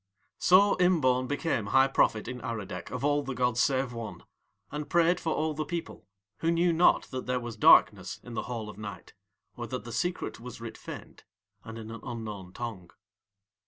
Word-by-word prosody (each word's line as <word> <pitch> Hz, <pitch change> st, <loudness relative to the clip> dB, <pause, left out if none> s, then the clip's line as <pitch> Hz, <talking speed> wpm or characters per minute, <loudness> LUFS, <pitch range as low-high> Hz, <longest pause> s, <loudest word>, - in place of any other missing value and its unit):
So 195 Hz, +3 st, +6 dB
Imbaun 130 Hz, -9 st, +3 dB
became 145 Hz, -6 st, -1 dB
High 135 Hz, +3 st, +5 dB
Prophet 110 Hz, -5 st, +2 dB
in 125 Hz, -1 st, -5 dB
Aradec 105 Hz, -6 st, -5 dB
of -, -, -5 dB
All 145 Hz, 0 st, +3 dB
the 135 Hz, -2 st, -5 dB
gods 125 Hz, -1 st, +1 dB
save 130 Hz, -2 st, +1 dB
One, 115 Hz, -2 st, -7 dB, 0.5 s
and 150 Hz, 0 st, -5 dB
prayed 170 Hz, +1 st, +3 dB
for 160 Hz, -, -2 dB
all 155 Hz, 0 st, 0 dB
the 155 Hz, +1 st, -2 dB
people, 165 Hz, -5 st, -6 dB, 0.3 s
who 165 Hz, -, +1 dB
knew 170 Hz, +1 st, +3 dB
not 170 Hz, +2 st, +5 dB
that 130 Hz, -1 st, -5 dB
there 125 Hz, 0 st, +1 dB
was 120 Hz, -2 st, -6 dB
darkness 105 Hz, -, +5 dB
in 120 Hz, -, -9 dB
the -, -, -2 dB
Hall 115 Hz, -3 st, -4 dB
of 105 Hz, -1 st, -10 dB
Night 105 Hz, -1 st, -8 dB, 0.4 s
or 120 Hz, -1 st, -5 dB
that 130 Hz, +1 st, -4 dB
the 120 Hz, -, -8 dB
secret 175 Hz, +6 st, -2 dB
was 125 Hz, +1 st, -9 dB
writ 115 Hz, -1 st, -7 dB
faint -, -, -10 dB, 0.4 s
and 115 Hz, 0 st, -8 dB
in 110 Hz, 0 st, -8 dB
an 115 Hz, -1 st, -8 dB
unknown 105 Hz, -6 st, -6 dB
tongue. 105 Hz, -6 st, -6 dB
125 Hz, 190 wpm, -29 LUFS, 115-155 Hz, 0.5 s, So